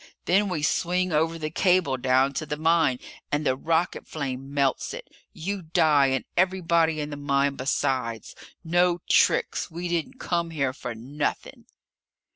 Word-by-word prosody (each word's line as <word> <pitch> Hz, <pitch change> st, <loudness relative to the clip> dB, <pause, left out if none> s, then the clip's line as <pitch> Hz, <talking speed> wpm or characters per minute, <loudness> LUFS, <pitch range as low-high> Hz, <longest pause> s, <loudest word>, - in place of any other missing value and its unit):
Then 200 Hz, +2 st, +3 dB
we 155 Hz, -5 st, -2 dB
swing 180 Hz, +3 st, +1 dB
over 160 Hz, +2 st, +1 dB
the 155 Hz, -1 st, -4 dB
cable 180 Hz, -5 st, +2 dB
down 130 Hz, +1 st, +2 dB
to 155 Hz, -, -3 dB
the 150 Hz, -, -3 dB
mine 160 Hz, -4 st, +3 dB, 0.3 s
and 150 Hz, +1 st, 0 dB
the 130 Hz, -, +2 dB
rocket 165 Hz, +5 st, -1 dB
flame 135 Hz, -2 st, -5 dB
melts 140 Hz, -2 st, 0 dB
it! -, -, -9 dB, 0.2 s
You 195 Hz, +4 st, -4 dB
die 155 Hz, -4 st, +3 dB
and 135 Hz, -1 st, -1 dB
everybody 170 Hz, -3 st, +2 dB
in 150 Hz, 0 st, -4 dB
the -, -, -4 dB
mine 140 Hz, -1 st, +1 dB
besides! 130 Hz, -3 st, -2 dB, 0.3 s
No 175 Hz, +1 st, +2 dB
tricks! -, -, +2 dB
We 170 Hz, +2 st, -5 dB
didn't 175 Hz, +10 st, -3 dB
come 170 Hz, -1 st, -1 dB
here 140 Hz, -5 st, -1 dB
for 125 Hz, -4 st, -6 dB
nothing!" 140 Hz, +6 st, -4 dB
155 Hz, 155 wpm, -25 LUFS, 140-170 Hz, 0.3 s, Then